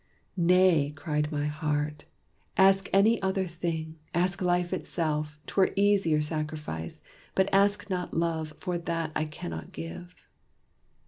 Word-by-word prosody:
"Nay!" 175 -4 +4
cried 150 0 -1
my 145 -1 -1
heart, 150 0 -2 0.5
"ask 195 0 +5
any 215 +3 +4
other 190 0 0
thing 165 -2 -4 0.2
Ask 180 +2 +1
life 180 0 +1
itself 155 -4 -2
'twere 190 -1 +2
easier 195 -6 +3
sacrifice. 150 - -4 0.3
But 190 +1 +2
ask 200 +1 +3
not 180 -2 -2
love, 160 -2 -1
for 180 -1 -2
that 165 -2 -2
I 155 - +1
cannot 85 - -7
give." 85 +2 -9
165 Hz, 125 wpm, -28 LUFS, 150-185 Hz, 0.5 s, ask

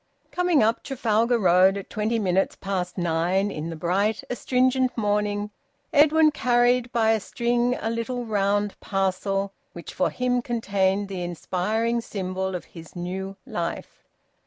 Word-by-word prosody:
Coming 355 -7 +2
up 225 +1 +1
Trafalgar 235 -2 +1
Road 190 -1 +4
at 200 - -8
twenty 215 +2 0
minutes 190 -3 +1
past 190 -2 -3
nine 175 +3 +1
in 155 -2 -5
the 165 - -5
bright, 195 +7 0
astringent 255 +1 +1
morning, 205 -1 0 0.4
Edwin 310 +1 +5
carried 245 -2 +2
by 225 -2 +3
a 220 - +2
string 240 +3 0
a 225 - -2
little 235 +2 -3
round 205 -1 0
parcel 195 0 -1 0.2
which 170 -2 -9
for 185 - +1
him 250 0 0
contained 200 -4 0
the 190 -2 -5
inspiring 210 +7 -1
symbol 190 -3 -3
of 180 - -5
his 165 0 -13
new 190 +2 -5
life. 170 -1 -5
205 Hz, 140 wpm, -25 LUFS, 190-240 Hz, 0.4 s, Edwin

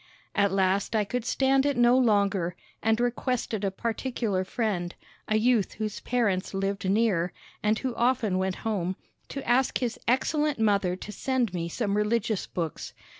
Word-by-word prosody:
At 200 -1 +2
last 195 +3 +1
I 215 - +3
could 240 +3 -3
stand 270 +2 +3
it 285 -2 +1
no 240 +1 +5
longer, 200 -7 +2 0.3
and 225 +1 +2
requested 240 -3 -1
a 195 - +2
particular 225 -1 -2
friend, 185 -4 -2 0.3
a 215 - +1
youth 225 -2 +2
whose 215 -1 -4
parents 205 -7 0
lived 195 0 -1
near, 195 -5 +2 0.3
and 215 +1 +2
who 260 0 -2
often 235 -5 +1
went 190 0 0
home, 190 -4 -1 0.3
to 275 - -6
ask 245 +2 +3
his 245 -2 -3
excellent 295 +4 +1
mother 200 -5 +2
to 210 - -8
send 250 -3 -1
me 170 -1 -2
some 205 +2 -1
religious 215 0 0
books. 165 -4 -4
215 Hz, 160 wpm, -27 LUFS, 195-245 Hz, 0.3 s, no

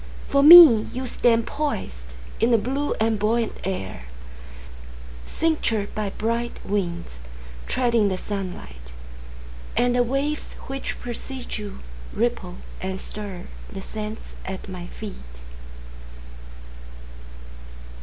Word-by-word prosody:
For 280 - +4
me, 300 -8 +10
You 255 +1 -4
stand 230 -2 +2
poisedIn - - -3
the 235 - +5
blue 270 +7 -1
and 220 -1 +1
buoyant 225 +2 +1
air, 95 - -4 1.2
Cinctured 235 -10 0
by 210 -2 -2
bright 230 +4 -2
winds, 175 - -3 0.5
Treading 235 -4 +2
the 190 -2 -1
sunlight. 70 - -6 0.8
And 245 0 +3
the 245 - +4
waves 275 +5 -1
which 270 0 -5
precede 245 +1 -7
youRipple 190 - -4 0.3
and 190 0 -3
stirThe 195 -1 -8
sands 215 +1 -6 0.2
at 190 +1 -6
my 180 -2 -7
feet. 210 0 -8
215 Hz, 95 wpm, -24 LUFS, 185-245 Hz, 1.2 s, me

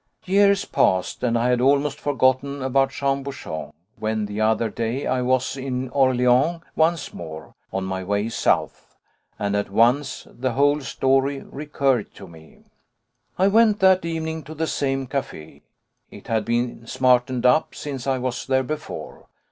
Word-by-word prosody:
Years 200 +1 +3
passed, 95 -1 +1
and 120 -2 +1
I 120 +2 +1
had 125 -1 +2
almost 140 +2 +2
forgotten 135 0 +1
about 135 +1 +2
Jean 140 0 -1
Bouchon, 135 - -6 0.3
when, 110 0 -1
the 105 +1 -4
other 110 +1 +2
day, 115 +5 -3
I 130 0 0
was 130 +1 0
in 130 -1 -4
Orléans 130 +5 +2
once 160 -1 +1
more, 80 -2 -9 0.2
on 95 - -2
my 95 0 -3
way 100 +3 -1
south, - - -1 0.4
and 100 0 -1
at 100 -1 -1
once 120 +7 +2
the 130 0 -3
whole 145 +3 +3
story 135 +1 +1
recurred 140 -5 -1
to 95 - -11
me. 80 -2 -17 0.7
I 190 - +4
went 215 0 +4
that 190 -1 +5
evening 160 -1 -3
to 155 +2 -9
the 160 +1 -1
same 135 -3 -1
café. 80 - -6 0.5
It - - -13
had 110 -1 -1
been 120 0 -2
smartened 125 -1 +2
up 125 +5 +3
since 140 -3 -6
I 135 -1 +1
was 130 0 -3
there 130 0 +2
before. 150 +3 -7
130 Hz, 155 wpm, -23 LUFS, 115-140 Hz, 0.7 s, that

